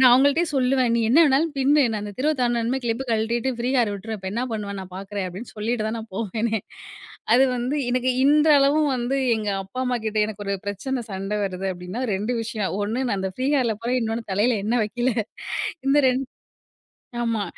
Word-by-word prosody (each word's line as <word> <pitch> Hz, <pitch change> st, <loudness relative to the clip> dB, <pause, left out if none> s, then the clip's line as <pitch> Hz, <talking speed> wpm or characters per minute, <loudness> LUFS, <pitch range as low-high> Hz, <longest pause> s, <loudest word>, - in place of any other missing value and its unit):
நான் 255 Hz, -1 st, +8 dB
அவங்கள்டயே 285 Hz, +6 st, +4 dB
சொல்லுவேன். 255 Hz, -1 st, +2 dB
"நீ 235 Hz, -, +2 dB
என்ன 280 Hz, +8 st, +6 dB
வேணாலும் 295 Hz, +3 st, +2 dB
பின்னு. 280 Hz, +2 st, +4 dB
நான் 215 Hz, -, -2 dB
அந்த 205 Hz, -, -5 dB
தெருவ 305 Hz, +4 st, +2 dB
தாண்டுனதுமே 240 Hz, +1 st, +1 dB
கிளிப்ப 235 Hz, +3 st, -1 dB
கழட்டிட்டு 230 Hz, +3 st, 0 dB
ஃப்ரீ 240 Hz, +1 st, -1 dB
ஹேர் 230 Hz, -4 st, +3 dB
விட்டுருவேன் 215 Hz, +2 st, -5 dB
இப்ப 190 Hz, 0 st, -5 dB
என்ன 235 Hz, +3 st, -1 dB
பண்ணுவன்னு 200 Hz, -2 st, -4 dB
நான் 185 Hz, -1 st, -10 dB
பாக்குறேன்" 195 Hz, 0 st, -4 dB
அப்டின்னு 195 Hz, +7 st, -9 dB
சொல்லிட்டு 220 Hz, +1 st, -1 dB
தான் 220 Hz, +1 st, -2 dB
நான் 225 Hz, -1 st, -9 dB
போவேனே! 220 Hz, +1 st, -1 dB, 0.8 s
அது 260 Hz, -, +6 dB
வந்து, 250 Hz, +5 st, -1 dB
எனக்கு 255 Hz, +1 st, +1 dB
இன்றளவும் 295 Hz, 0 st, +5 dB
வந்து 245 Hz, +2 st, -1 dB, 0.2 s
எங்க 215 Hz, -1 st, -3 dB, 0.2 s
அப்பா, 195 Hz, +7 st, -6 dB
அம்மா 250 Hz, 0 st, 0 dB
கிட்ட 215 Hz, 0 st, -1 dB
எனக்கு 210 Hz, -1 st, -7 dB
ஒரு 200 Hz, -, 0 dB
பிரச்சன, 235 Hz, +5 st, -3 dB
சண்ட 195 Hz, +2 st, -3 dB
வருது 190 Hz, 0 st, -3 dB
அப்டின்னா 180 Hz, +7 st, -6 dB
2 215 Hz, +6 st, -1 dB
விஷயம். 215 Hz, -4 st, -3 dB
ஒண்ணு 225 Hz, +5 st, -2 dB
நான் 200 Hz, -, 0 dB
அந்த 190 Hz, -, -2 dB
ஃப்ரீ 260 Hz, +2 st, -1 dB
ஹேர்ல 235 Hz, -4 st, +1 dB
போறேன். 250 Hz, +2 st, +1 dB
இன்னொன்னு 225 Hz, -1 st, -3 dB
தலையில 220 Hz, +4 st, +2 dB
எண்ணெய் 230 Hz, +1 st, +2 dB
வைக்கில. 240 Hz, +4 st, -1 dB, 0.8 s
இந்த 285 Hz, +2 st, +5 dB
ரெண் 255 Hz, +1 st, +1 dB, 1.0 s
ஆமா. 225 Hz, -3 st, 0 dB
235 Hz, 190 wpm, -23 LUFS, 210-255 Hz, 1.0 s, நான்